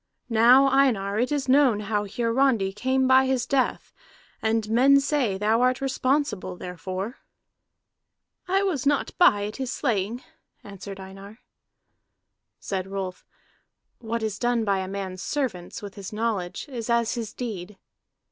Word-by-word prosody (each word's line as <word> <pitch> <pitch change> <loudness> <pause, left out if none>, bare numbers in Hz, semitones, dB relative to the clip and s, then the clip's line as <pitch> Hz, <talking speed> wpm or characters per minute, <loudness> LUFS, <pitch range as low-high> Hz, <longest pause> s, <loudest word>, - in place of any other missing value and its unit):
"Now, 245 +4 +6
Einar, 230 -7 +2
it 250 +4 0
is 285 -3 -1
known 260 -5 +4
how 210 0 -1
Hiarandi 230 -2 +1
came 260 +5 +1
by 260 0 +5
his 260 -2 0
death, 270 -2 -1 0.5
and 220 -1 0
men 260 +5 +5
say 275 -8 0
thou 215 +4 +2
art 255 +1 +2
responsible 265 -7 -1
therefor." 185 - -6 1.3
"I 385 +2 +2
was 300 -9 -1
not 285 -1 0
by 205 - +5
at 210 - -6
his 265 -2 -3
slaying," 230 -1 -1 0.4
answered 195 0 -9
Einar. 195 +2 -11 1.2
Said 190 -1 -4
Rolf: 195 -2 -6 0.7
"What 230 -1 -3
is 215 -1 -3
done 240 -2 +1
by 200 -2 +1
a 190 - -4
man's 190 -1 -5
servants, 230 -9 -3
with 200 -1 -7
his 195 -2 -8
knowledge, 210 -5 -2
is 240 -4 -6
as 235 -1 +2
his 230 -4 -4
deed." 210 -5 -6
225 Hz, 140 wpm, -25 LUFS, 195-260 Hz, 1.3 s, Now